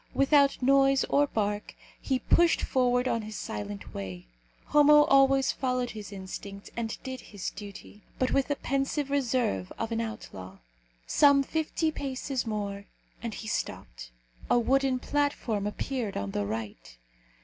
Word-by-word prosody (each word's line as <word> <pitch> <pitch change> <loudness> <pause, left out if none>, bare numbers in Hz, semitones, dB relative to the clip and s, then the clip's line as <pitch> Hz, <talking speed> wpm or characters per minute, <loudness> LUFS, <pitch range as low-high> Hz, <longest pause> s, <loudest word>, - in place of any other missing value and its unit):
Without 275 -1 +4
noise 275 0 +4
or 290 +1 +4
bark 210 -3 -2 0.3
he 265 - 0
pushed 340 +7 +3
forward 250 -1 +2
on 230 -2 0
his 215 0 -8
silent 105 - -6
way. 95 -2 -6 0.4
Homo 295 0 +6
always 270 -1 +4
followed 250 -2 -1
his 210 -2 -8
instinct 195 +1 -8
and 225 -1 -3
did 260 -2 -6
his 200 -3 -6
duty, 205 0 -10 0.2
but 255 - 0
with 275 - +2
the 285 - 0
pensive 275 +1 -1
reserve 245 - 0
of 225 0 -3
an 230 0 0
outlaw. 95 - -7 0.5
Some 280 -1 +5
fifty 315 +2 -1
paces 270 -3 -3
more, 200 -2 -3 0.4
and 230 -1 -4
he 220 - -7
stopped. - - -4 0.4
A - - +5
wooden 265 +2 +2
platform 250 -7 -1
appeared 230 0 -3
on 100 0 -3
the 100 0 -2
right. 105 - -6
245 Hz, 145 wpm, -28 LUFS, 200-275 Hz, 0.5 s, Homo